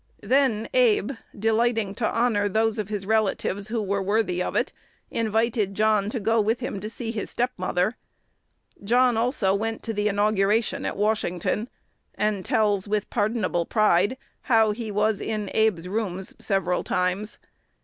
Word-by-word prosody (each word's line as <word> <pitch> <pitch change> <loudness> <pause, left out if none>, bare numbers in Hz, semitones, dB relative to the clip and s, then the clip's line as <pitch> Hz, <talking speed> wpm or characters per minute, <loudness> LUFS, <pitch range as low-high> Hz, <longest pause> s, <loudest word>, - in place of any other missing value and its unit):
Then 235 -1 +2
Abe, 460 - +3 0.3
delighting 225 -1 +1
to 220 +1 -1
honor 225 -4 +1
those 220 +2 +1
of 210 -1 -3
his 205 -2 -3
relatives 205 -2 0
who 225 -1 -2
were 200 0 -1
worthy 195 -2 0
of - - -3
it, - - 0 0.4
invited 220 -2 0
John 215 -1 +2
to 235 - -3
go 225 +2 +2
with 220 +3 0
him 235 -5 -4
to 210 +2 -5
see 225 0 -5
his 220 -3 -4
step 245 +1 -1
mother. 185 +4 0 0.9
John 245 +3 +3
also 225 -4 +1
went 225 +3 -2
to 225 - -3
the 210 0 0
inauguration 205 +1 +1
at - - -4
Washington, 210 +1 0 0.5
and 210 -3 0
tells, 205 -2 +1
with 210 0 -1
pardonable 210 -6 0
pride, 210 +2 +3 0.3
how 225 -3 +5
he 220 +1 -5
"was 210 0 +1
in 215 -3 -3
his 220 0 +4
[Abe's] 180 -5 -3
rooms 190 -2 -3
several 185 -3 0
times." 185 +4 -1
215 Hz, 160 wpm, -25 LUFS, 200-225 Hz, 0.9 s, how